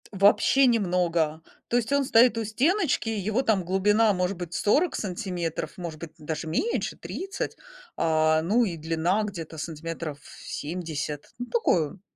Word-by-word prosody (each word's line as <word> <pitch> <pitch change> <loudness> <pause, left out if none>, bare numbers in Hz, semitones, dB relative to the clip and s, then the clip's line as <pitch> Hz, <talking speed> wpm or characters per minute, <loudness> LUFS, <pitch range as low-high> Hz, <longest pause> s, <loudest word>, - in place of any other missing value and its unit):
Вообще 205 +7 +5
немного! 175 -8 +1 0.3
То 240 - +2
есть 240 +1 -1
он 280 0 +3
стоит 240 -2 +5
у 225 - 0
стеночки, 265 - +1
его 215 +3 0
там 210 -6 +2
глубина, 205 +5 +3
может 180 +1 -1
быть, 175 -1 -6
40 300 +12 +2
сантиметров, 180 -5 -3
может 170 -4 -6
быть, 165 -1 -8
даже 155 +1 -5
меньше, 405 - -1
30. 385 0 -5 0.4
А, 155 -1 +3
ну 210 +9 +3
и 180 -5 -3
длина 165 +6 0
где-то 170 -6 -6
сантиметров 160 0 -5 0.3
70. 150 -2 -5
Ну 245 - -3
такой 180 - +2
он 180 +5 -14
180 Hz, 150 wpm, -26 LUFS, 160-225 Hz, 0.4 s, Вообще